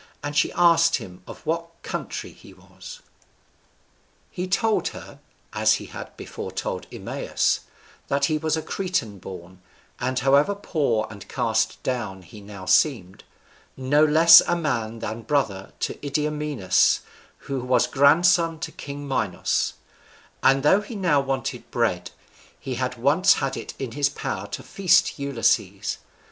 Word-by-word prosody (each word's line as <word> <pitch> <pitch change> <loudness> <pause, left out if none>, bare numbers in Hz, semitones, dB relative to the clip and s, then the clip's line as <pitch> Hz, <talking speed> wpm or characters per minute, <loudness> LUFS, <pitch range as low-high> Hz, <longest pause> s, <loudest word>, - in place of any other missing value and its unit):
And 145 0 -4
she - - +2
asked 170 -1 +4
him 90 -1 -8
of - - -11
what 165 +1 -2
country - - -5
he - - -16
was. - - -13 1.3
He 180 0 -4
told 220 +3 +1
her - - -9 0.3
(as - - +3
he - - -6
had - - -10
before - - -7
told - - -4
Eumaeus) - - -1 0.5
that 140 0 +1
he 155 +1 0
was 160 0 0
a 160 - -4
Cretan 180 - -3
born, 90 0 -10 0.4
and, 130 0 -2
however 140 +9 +3
poor 145 - 0
and 100 -3 -11
cast - - -1
down 110 -7 -3
he 105 +5 -13
now 100 -2 -10
seemed, 100 - +1 0.5
no 140 +3 +3
less 165 +2 +8
a 175 - +2
man 115 -9 -2
than 110 +2 -4
brother 110 -8 -1
to - - -4
Idomeneus, 150 -6 +1 0.4
who 135 -1 -3
was 125 +1 +2
grandson 165 +4 +4
to - - -4
king 145 0 -8
Minos; 110 -9 -1 0.7
and 135 0 +4
though 190 +7 +5
he 215 +3 -9
now 175 -8 +2
wanted 135 -2 -4
bread, 100 -8 -1 0.5
he 135 - -5
had 125 0 -3
once 155 +10 +4
had 135 - -2
it - - -7
in 130 -4 -5
his 145 +2 +1
power 95 -6 -5
to 100 - -7
feast 190 -5 +2
Ulysses. 140 -5 0
140 Hz, 145 wpm, -24 LUFS, 115-165 Hz, 1.3 s, less